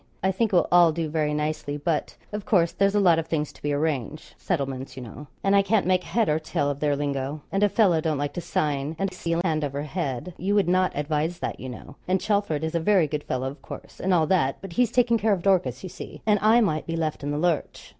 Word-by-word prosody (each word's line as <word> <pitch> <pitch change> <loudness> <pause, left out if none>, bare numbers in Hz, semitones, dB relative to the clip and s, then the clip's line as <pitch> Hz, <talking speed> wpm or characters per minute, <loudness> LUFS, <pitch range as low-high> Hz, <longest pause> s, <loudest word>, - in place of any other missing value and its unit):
I 190 - +3
think 220 +3 0
it - - +1
will 175 - +4
all 175 -2 +6
do 160 0 -3
very 150 -1 0
nicely; 150 -1 -2
but, 150 +1 -2
of 210 0 -4
course, 170 -5 +3
there's 200 +1 +1
a - - +4
lot 175 -5 +5
of 165 - -4
things 150 -3 -2
to - - -19
be 145 - -1
arranged 145 -1 -2
settlements, 135 -6 -3
you 130 - -6
know 135 +6 -10 0.2
and 195 0 +3
I 200 - +6
can't 200 +1 +1
make 185 0 +2
head 230 +3 0
or 150 +1 +2
tail 145 -2 -1
of 140 - -6
their 145 -1 +1
lingo, 140 0 -3
and 195 - 0
a 205 - +4
fellow 190 -5 +3
don't 155 -2 0
like 145 0 -2
to 175 - -4
sign 150 -1 -1
and 195 0 -2
seal 170 -2 -1
hand 155 -4 0
over 140 0 -3
head 150 0 -4
you 195 +4 0
would 200 -4 +3
not 185 +1 +2
advise 150 +3 -1
that, - - -4
you 130 - -6
know; 125 +3 -10
and 185 +1 +2
Chelford 200 -6 0
is 160 - -2
a 170 - +1
very 185 0 +3
good 150 0 -4
fellow, 130 +1 -2
of 140 +3 -8
course, - - -10
and 190 - 0
all 170 -3 +4
that 150 -6 +1
but 195 -3 -9
he's 245 +1 +2
taking 235 -2 +3
care 215 0 +2
of 180 -3 -2
Dorcas, 175 -10 +1
you 185 - -5
see; - - -10
and 210 -2 +3
I 225 +3 +5
might 155 -8 0
be 165 - -2
left 155 -3 -2
in 145 - -3
the 145 - -1
lurch.' 170 -1 -1
165 Hz, 265 wpm, -25 LUFS, 145-190 Hz, 0.2 s, all